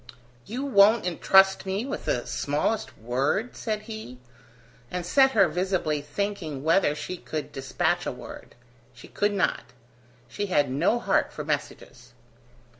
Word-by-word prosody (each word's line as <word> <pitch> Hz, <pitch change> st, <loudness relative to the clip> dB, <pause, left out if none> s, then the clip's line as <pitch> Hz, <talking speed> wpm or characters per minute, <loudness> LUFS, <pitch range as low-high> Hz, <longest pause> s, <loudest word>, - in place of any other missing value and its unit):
"You 250 Hz, +7 st, -4 dB
won't 215 Hz, -4 st, +5 dB
entrust 190 Hz, +2 st, +4 dB
me 195 Hz, +5 st, -1 dB
with 275 Hz, -, -5 dB
the 120 Hz, -, -1 dB
smallest 150 Hz, +10 st, -2 dB
word?" 135 Hz, -, -1 dB
said 215 Hz, -2 st, -3 dB
he, 220 Hz, -, -8 dB, 0.7 s
and 180 Hz, -1 st, -4 dB
set 265 Hz, +8 st, +4 dB
her 195 Hz, -4 st, +5 dB
visibly 175 Hz, -3 st, -1 dB
thinking 160 Hz, -3 st, -4 dB
whether 160 Hz, -1 st, +3 dB
she 180 Hz, +4 st, -5 dB
could 155 Hz, -3 st, -5 dB
dispatch 135 Hz, 0 st, -1 dB
a -, -, -1 dB
word. -, -, -11 dB, 0.4 s
She -, -, -13 dB
could 205 Hz, 0 st, 0 dB
not; 195 Hz, -, -1 dB, 0.5 s
she 205 Hz, -, -4 dB
had 145 Hz, -8 st, +1 dB
no 165 Hz, -, +2 dB
heart 240 Hz, -, +1 dB
for -, -, -6 dB
messages. -, -, -5 dB
190 Hz, 140 wpm, -26 LUFS, 150-210 Hz, 0.7 s, won't